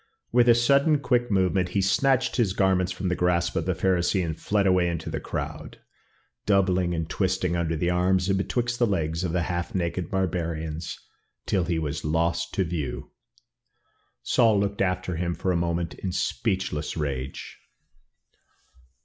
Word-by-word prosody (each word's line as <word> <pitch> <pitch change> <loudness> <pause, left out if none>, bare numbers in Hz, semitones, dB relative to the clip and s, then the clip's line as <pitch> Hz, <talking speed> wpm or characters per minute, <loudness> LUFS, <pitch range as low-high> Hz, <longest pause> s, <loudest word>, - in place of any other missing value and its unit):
With 120 0 +4
a 120 - +7
sudden, 140 +6 +4
quick 120 -4 +1
movement, 95 -2 +1
he - - +3
snatched 130 +6 +2
his 110 -7 +2
garments 95 -2 +2
from 90 +1 -3
the 90 - 0
grasp 90 -1 +1
of 85 +1 -1
the 95 - +1
Pharisee 90 0 +1
and 80 -2 -3
fled 100 +4 0
away 90 -2 +3
into 85 -2 -3
the - - -2
crowd, - - -6 0.7
doubling 95 -3 +2
and 80 -1 -2
twisting 95 -2 0
under 85 -1 -1
the 85 +3 0
arms 90 +1 +2
and 95 - +2
betwixt 120 +5 -1
the 120 - +3
legs 80 -3 -1
of 90 - -1
the 85 0 0
half 85 +1 -3
naked 85 -1 -2
barbarians 85 -3 -2 0.5
till 95 -3 +1
he 85 -1 -1
was 75 -3 -3
lost 85 +2 0
to 95 - +2
view. 75 -6 -4 1.1
Saul 115 -5 +3
looked 100 0 -1
after 90 -2 -1
him 85 0 -1
for 95 - -1
a - - +1
moment 85 -1 -1
in 95 - -5
speechless 95 -7 -2
rage. 70 -3 -4
90 Hz, 165 wpm, -26 LUFS, 85-95 Hz, 1.1 s, a